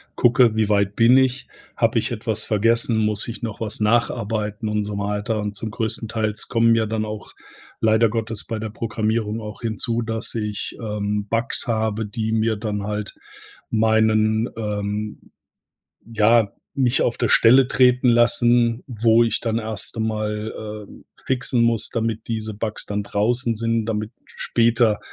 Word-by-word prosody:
gucke, 120 -2 +4
wie 110 -1 +1
weit 100 -1 +1
bin 120 +3 +5
ich, 130 0 0 0.3
habe - - +2
ich - - -2
etwas - - 0
vergessen, 115 +2 +2
muss 105 -1 0
ich 115 0 -7
noch 110 -2 -5
was 110 -2 -1
nacharbeiten 110 -1 0
und 105 0 -1
so 105 0 -5
weiter 105 +2 -2
und 105 0 -4
zum 110 +2 -4
Größtenteils 110 -1 -3
kommen 115 0 +3
ja 110 -1 +1
dann 110 0 -2
auch 105 -1 -8 0.5
leider 110 0 +3
Gottes 115 -1 -3
bei 115 - -3
der 110 -1 -5
Programmierung 110 0 -2
auch 105 -1 -9
hinzu, 115 +1 -1
dass 115 0 -2
ich, 105 -3 -3
ähm, 105 -1 -3
Bugs 115 +2 0
habe, 110 -1 -1
die 110 +1 -3
mir 110 0 +1
dann 105 -1 -3
halt 105 0 -4 0.6
meinen, 110 0 +2
ähm 105 -1 -3 0.9
ja, 115 -1 +3 0.2
mich 130 -1 +2
auf 120 - -1
der - - +1
Stelle 125 +3 +6
treten 125 0 +3
lassen, 120 0 +3
wo 115 -1 +3
ich 115 0 +1
dann 115 -1 -1
erst 110 -1 -4
einmal, 110 -1 -3 0.3
äh, - - -14 0.3
fixen 125 -2 +1
muss, 115 -2 +1
damit 115 -1 -2
diese 110 -2 -4
Bugs 105 +1 -3
dann 105 0 -2
draußen 115 +4 0
sind, 115 0 0
damit 110 0 -3
später 115 -2 +1
110 Hz, 155 wpm, -22 LUFS, 105-115 Hz, 0.9 s, Stelle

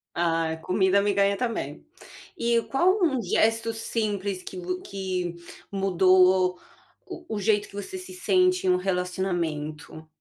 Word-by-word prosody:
Ah, 165 -1 0
comida 190 +2 +2
me 205 - +1
ganha 200 0 +3
também. 210 - -3 0.5
E 235 -2 +2
qual 370 +9 +2
um 270 -7 +2
gesto 225 +3 +1
simples 205 -4 -2
que - - -8
v 180 +1 -4
que 185 -3 -4 0.4
mudou 185 -1 +4 0.5
o 360 -2 -9
o - - -2
jeito 205 0 +1
que - - -15
você 205 - -6
se 370 0 -9
sente 365 - +2
em - - +4
um 180 - +4
relacionamento? 175 -5 -3
195 Hz, 140 wpm, -26 LUFS, 180-225 Hz, 0.5 s, mudou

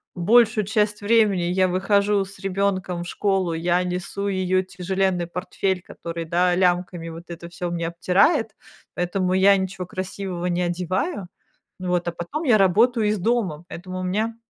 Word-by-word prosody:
большую 220 +4 +4
часть 210 0 0
времени 210 -3 +3
я 185 +2 +2
выхожу 200 +2 +2
с 195 +1 -11
ребёнком 190 -2 -1
в - - -8
школу, 190 -4 0
я 175 +2 +1
несу 180 +2 -3
её 185 -1 +1
тяжеленный 185 -1 -1
портфель, 180 +1 -2
который, 170 -1 -7
да, 175 +2 +2
лямками 175 -2 0
вот 165 +1 -9
это 170 0 -8
всё 175 0 -5
мне 170 -1 -2
обтирает, 200 - +2 0.4
поэтому 180 +1 -1
я 195 +1 +5
ничего 190 -1 -4
красивого 185 -1 -5
не 175 0 0
одеваю, 180 - -2 0.5
вот, 180 -1 -1
а 170 - -1
потом 175 - -5
я 245 -8 +5
работаю 215 +4 +3
из 210 +1 +1
дома, 185 -7 -1
поэтому 185 +1 -7
у - - -4
меня, 215 +5 -1
185 Hz, 155 wpm, -23 LUFS, 175-200 Hz, 0.5 s, я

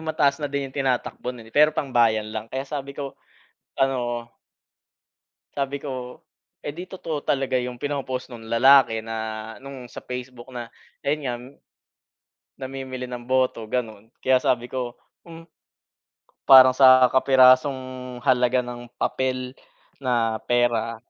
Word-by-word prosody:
mataas 155 -3 +1
na 150 - -2
din 140 -1 -3
yung 130 - -17
tinatakbo 130 -2 -1
nun, 115 -2 -12
eh, - - -22
pero 150 +1 +5
pangbayan 115 -5 +1
lang. 110 0 -5
Kaya 130 +1 -2
sabi 140 -2 -5
ko 140 -1 -6 0.6
ano 120 -3 -1 1.2
Sabi 140 0 -2
ko, 130 -3 -7 0.4
"Eh, 145 - -3
'di 180 +4 -8
totoo 165 -5 -5
talaga 135 -2 0
yung 125 0 -5
pino-post 130 -1 -4
nung 115 -2 -10
lalaki 115 -2 +5
na 115 0 -5 0.4
nung 135 -2 -9
sa - - -8
Facebook 125 0 -8
na, 120 -2 -8 0.3
ayun 150 +2 0
nga, 120 - -1 1.3
namimili 130 -1 -6
ng 125 -1 -7
boto," 130 -2 0
ganun. 110 -1 -4
Kaya 130 0 +3
sabi 120 0 0
ko, 125 -2 -4 0.3
hmm, 165 0 -12 1.0
parang 130 -1 +10
sa 130 -1 +7
kapirasong 130 -1 +3
halaga 125 0 +3
ng 120 0 -8
papel 130 -1 -2 0.5
na 115 -4 0
pera, 120 -2 +1
130 Hz, 135 wpm, -24 LUFS, 120-135 Hz, 1.3 s, parang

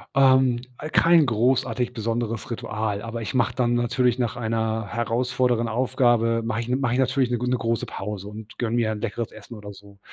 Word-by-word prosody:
Ähm, 130 -3 +4 0.2
äh, 155 - -6
kein 165 -1 +5
großartig 125 +1 +1
besonderes 115 0 -3
Ritual, 110 -3 -3
aber 115 +1 -5
ich 110 - -4
mache 120 -3 +1
dann 120 -2 +1
natürlich 120 +1 +1
nach 120 -2 -1
einer 110 -1 -1
herausfordernden 120 +1 0
Aufgabe 115 -1 +2
mache 115 0 -1
ich 120 - -5
mache 130 -1 0
ich 125 - +1
natürlich 130 -1 +1
'ne 120 - 0
gön 125 +1 -2
große 115 -2 -1
Pause 100 0 -6
und 105 +1 -11
gönne 120 -1 -1
mir 115 -2 +1
'n 105 - -5
leckeres 115 +1 -4
Essen 110 +2 -11
oder 105 -1 -9
so. 100 0 -16
115 Hz, 190 wpm, -24 LUFS, 110-125 Hz, 0.2 s, kein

